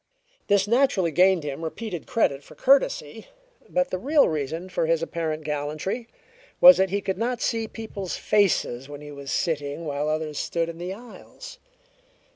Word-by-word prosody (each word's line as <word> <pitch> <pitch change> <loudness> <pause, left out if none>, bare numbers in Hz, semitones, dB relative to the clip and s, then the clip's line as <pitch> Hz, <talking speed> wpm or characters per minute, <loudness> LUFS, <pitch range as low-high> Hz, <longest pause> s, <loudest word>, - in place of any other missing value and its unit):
This 200 -1 +3
naturally 230 -8 +2
gained 185 0 +4
him 145 +2 -5
repeated 175 +1 -5
credit 140 -11 +1
for - - -15
courtesy, 280 - +2 0.4
but 270 0 0
the 185 - -2
real 285 +6 +4
reason 160 +3 -3
for 180 -3 -1
his 165 0 +1
apparent 160 -2 -3
gallantry 150 +10 -3 0.5
was 180 0 +10
that 190 0 +2
he 200 +2 -1
could 190 0 -3
not 240 +1 -1
see 225 -2 -1
people's 210 -5 -6
faces 145 -10 +1
when 145 0 -9
he 150 0 -9
was 140 -1 -7
sitting 150 -2 -2
while 145 0 -2
others 155 -1 -2
stood 170 -1 -1
in 165 0 -8
the 180 +2 -4
aisles. 245 - -11
175 Hz, 165 wpm, -25 LUFS, 155-215 Hz, 0.5 s, was